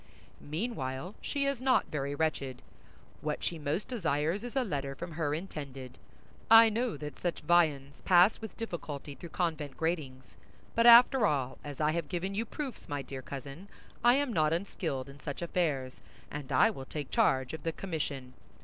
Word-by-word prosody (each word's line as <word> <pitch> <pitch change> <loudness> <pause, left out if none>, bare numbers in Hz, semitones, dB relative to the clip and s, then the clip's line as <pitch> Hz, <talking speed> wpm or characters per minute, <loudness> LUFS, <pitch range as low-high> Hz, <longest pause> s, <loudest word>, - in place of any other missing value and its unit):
Meanwhile, 155 - -4
she 280 -1 -1
is 275 -3 -1
not 255 -2 +2
very 140 -1 -2
wretched; 140 -5 -2 0.6
what 150 0 -3
she 170 - -2
most 150 +7 -2
desires 170 - -1
is 245 +1 -7
a 265 - +2
letter 140 - -3
from 170 +4 -7
her 155 -2 -1
intended. 140 -7 -7 0.5
I 225 0 +9
know 230 -3 -1
that 150 0 -7
such 175 -1 -2
viands 150 -5 +2
pass 180 +5 +5
with 220 -4 -8
difficulty 155 - -5
through 170 +4 -10
convent 160 -6 -2
gratings; 150 -6 -3 0.4
but 230 +1 +4
after 240 0 +8
all, 135 -5 -1
as 145 -2 -7
I 155 0 +3
have 170 -1 -2
given 190 +2 -2
you 220 +3 -1
proofs, 275 -1 -6
my 145 -1 -2
dear 130 0 -7
cousin, 140 +7 -8 0.4
I 240 +1 +7
am 280 -3 0
not 155 -3 +3
unskilled 165 -7 -3
in 140 +1 -12
such 145 +4 -5
affairs, 150 -7 -1 0.3
and 145 -2 -6
I 225 - +5
will 135 -10 -8
take 145 0 -6
charge 130 +1 +2
of 160 - -5
the 165 - -1
commission. 145 -8 -4
160 Hz, 175 wpm, -31 LUFS, 140-200 Hz, 0.6 s, I